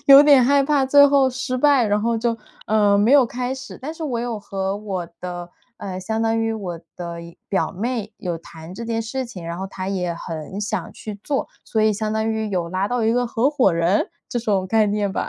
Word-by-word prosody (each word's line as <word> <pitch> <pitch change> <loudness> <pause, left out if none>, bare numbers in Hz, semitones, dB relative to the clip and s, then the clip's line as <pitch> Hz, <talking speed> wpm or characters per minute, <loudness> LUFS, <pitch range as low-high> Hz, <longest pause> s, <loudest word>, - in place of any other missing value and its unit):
有 275 0 +10
点 285 -3 +7
害 280 +2 +4
怕 280 -1 +2
最 285 +2 +7
后 275 -2 +4
失 255 0 -3
败， 275 -2 +4
然 205 0 +1
后 230 +2 +1
就 230 0 0 0.3
呃， 205 -2 +4
没 220 +6 +4
有 280 -3 +7
开 250 +2 -3
始。 265 - -9
但 305 +5 -5
是 325 - -8
我 255 -6 -2
有 235 -2 -3
和 195 0 -3
我 195 -4 -4
的 175 -1 -6 0.3
呃， 185 -4 -6
相 220 +4 -2
当 225 0 +1
于 225 0 0
我 180 -6 -5 0.2
的 170 -1 -6
一 170 0 -13
表 195 - 0
妹 220 +1 -3
有 175 -5 -3
谈 165 +1 -11
这 235 - -6
件 225 0 -1
事 255 +4 -3
情， 190 -8 -9
然 170 0 -4
后 190 - -3
她 190 -1 -6
也 180 -3 -1
很 165 +3 -6
想 210 - -3
去 210 -2 -8
做， 280 -2 -1 0.2
所 220 - -1
以 215 0 +4
相 215 +1 -2
当 220 0 0
于 220 -1 -1
有 180 -4 -1
拉 185 +3 -1
到 245 -1 0
一 225 - +3
个 245 0 +1
合 235 +3 +1
伙 255 - +3
人 170 +4 +2 0.2
这 240 - -2
种 200 -5 0
概 215 +2 +3
念 205 -1 0
吧。 - - -2
220 Hz, 250 characters per minute, -22 LUFS, 190-245 Hz, 0.3 s, 有